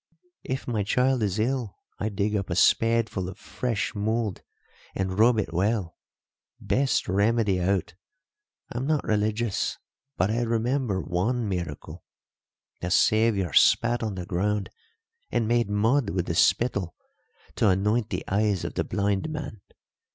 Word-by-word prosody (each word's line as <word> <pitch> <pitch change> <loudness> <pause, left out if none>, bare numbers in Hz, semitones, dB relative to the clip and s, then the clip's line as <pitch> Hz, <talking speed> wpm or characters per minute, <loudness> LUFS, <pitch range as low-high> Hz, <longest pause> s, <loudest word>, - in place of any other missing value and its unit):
If 130 +1 -4
my 115 -4 0
child 125 +5 +1
is 100 -2 0
ill 120 -1 -1 0.2
I 105 - -1
dig 105 +1 -1
up 100 -2 -2
a 85 - -1
spadeful 115 -2 +2
of 95 - -9
fresh 120 -5 -3
mould 110 -1 -1 0.5
and 95 +1 -2
rub 115 +1 +5
it 105 -5 -2
well 95 -1 0 0.6
best 135 0 +1
remedy 100 0 +2
out. 95 -1 0 0.8
I'm 125 +3 -3
not 155 -2 +1
religious, 110 0 0 0.4
but 95 +4 +2
I 115 +2 0
remember 115 -2 0
one 110 +8 -1
miracle. 85 -7 -5 0.8
The 90 - -2
Saviour 105 -2 +2
spat 120 0 +4
on 110 -3 -3
the 90 -1 -5
ground 100 +3 -1 0.6
and 115 - 0
made 120 -2 +1
mud 110 +4 +2
with 90 -3 -1
the 80 - -2
spittle 95 0 +2 0.6
to 110 - +4
anoint 105 +4 +1
the - - -3
eyes 100 -2 +1
of - - -4
the - - -1
blind 100 +6 -1
man. 145 -9 -6
105 Hz, 145 wpm, -26 LUFS, 95-115 Hz, 0.8 s, rub